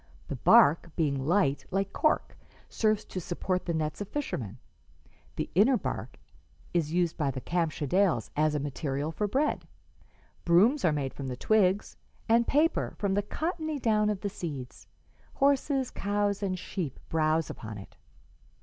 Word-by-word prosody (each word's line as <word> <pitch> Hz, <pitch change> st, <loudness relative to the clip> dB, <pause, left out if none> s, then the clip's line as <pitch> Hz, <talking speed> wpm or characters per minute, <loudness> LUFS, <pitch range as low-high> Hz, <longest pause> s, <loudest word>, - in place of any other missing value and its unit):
The -, -, -2 dB
bark, 160 Hz, +4 st, +5 dB
being 140 Hz, -4 st, 0 dB
light, 170 Hz, -6 st, +2 dB
like 195 Hz, +1 st, -1 dB
cork, 310 Hz, -, +1 dB, 0.3 s
serves 215 Hz, -2 st, 0 dB
to 185 Hz, -, -5 dB
support 180 Hz, +2 st, -2 dB
the 170 Hz, -, -1 dB
nets 155 Hz, +3 st, -2 dB
of 205 Hz, -, -4 dB
fishermen; 125 Hz, -, -4 dB, 0.8 s
the -, -, -2 dB
inner 230 Hz, +8 st, +5 dB
bark -, -, -5 dB, 0.6 s
is 165 Hz, -4 st, 0 dB
used 175 Hz, -1 st, 0 dB
by 145 Hz, -3 st, 0 dB
the 130 Hz, -, -4 dB
Kamschadales 165 Hz, -, 0 dB
as 150 Hz, 0 st, +2 dB
a -, -, 0 dB
material 145 Hz, +1 st, -3 dB
for 205 Hz, +6 st, -1 dB
bread; 275 Hz, +9 st, 0 dB, 0.8 s
brooms 210 Hz, -, +4 dB
are 170 Hz, -, +4 dB
made 140 Hz, -3 st, -2 dB
from 135 Hz, -, -6 dB
the 125 Hz, -1 st, -4 dB
twigs, 200 Hz, +2 st, +2 dB, 0.3 s
and 230 Hz, +1 st, +4 dB
paper 305 Hz, +4 st, +1 dB
from 200 Hz, -2 st, 0 dB
the 205 Hz, -, +2 dB
cottony 315 Hz, -, -3 dB
down 215 Hz, -4 st, +2 dB
of 205 Hz, -3 st, -2 dB
the 205 Hz, -, -2 dB
seeds. 140 Hz, -9 st, -7 dB, 0.5 s
Horses, 275 Hz, -1 st, +2 dB
cows 205 Hz, 0 st, -1 dB
and 190 Hz, -2 st, -1 dB
sheep 175 Hz, -6 st, -5 dB
browse 160 Hz, 0 st, +1 dB
upon 110 Hz, -2 st, -8 dB
it. 100 Hz, -, -12 dB
180 Hz, 155 wpm, -29 LUFS, 150-210 Hz, 0.8 s, bark